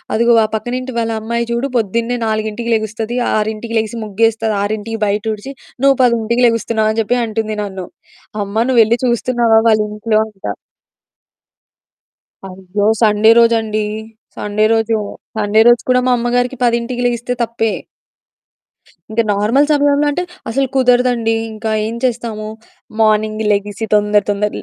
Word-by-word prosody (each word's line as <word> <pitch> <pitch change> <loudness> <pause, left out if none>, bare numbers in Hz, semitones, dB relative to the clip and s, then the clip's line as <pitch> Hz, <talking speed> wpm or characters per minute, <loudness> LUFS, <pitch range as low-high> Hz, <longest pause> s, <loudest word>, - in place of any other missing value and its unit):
అదిగో 235 +2 +3
వ - - +4
"పక్కనింటి 250 +4 -4
వాళ్ళ 230 -1 -1
అమ్మాయి 235 +1 -2
చూడు 235 +3 -1
పొద్దున్నే 230 +3 -1
4కి 220 +2 -2
లెగుస్తది. 220 +2 -3 0.2
6కి 220 +2 -3
లెగిసి 220 +1 -4
ముగ్గేస్తది, 220 +1 0
6కి 215 +2 -3
బయటూడ్చి, 210 +4 -3 0.3
నువ్వు 275 0 +5
10కి 235 0 +1
లెగుస్తున్నావు" 230 -1 0
అని 220 - -2
జెప్పి 240 +3 0
అంటుంది 220 -1 -3
నన్ను. 190 -2 -6 0.6
అమ్మ 200 +1 -8
నువ్వెళ్ళి 235 -2 +4
చూస్తున్నావా 240 -2 +2
వాళ్ళింట్లో? 215 0 +1
అంటా. 195 - -6 1.9
అయ్యో! 190 +2 -4 0.2
సండే 215 0 +4
రోజండి, 225 -2 +2 0.5
సండే 210 +1 0
రోజు. 225 0 +1 0.4
సండే 215 +1 +3
రోజు 240 0 +5
కూడా 250 0 +3
మా - - +4 0.2
అమ్మగారికి 245 +1 -1 0.4
10కి - - -1
లెగిస్తే 240 +1 -2
తప్పే. 225 -1 -1 1.4
ఇంకా 230 +1 +1
నార్మల్ 225 +8 +2
సమయంలో 290 0 +3
అంటే 355 +5 -2 0.3
అసలు 270 +4 0
కుదరదండి. 245 -3 +2 0.2
ఇంకా 220 0 -4 0.2
ఏం 230 - -5
చేస్తాము? 230 -4 -2 0.5
మార్నింగ్ 215 0 +1
లెగిసి 205 +1 -2
తొందర 210 0 +3
తొందర 205 +1 0
225 Hz, 125 wpm, -16 LUFS, 215-235 Hz, 1.9 s, నువ్వు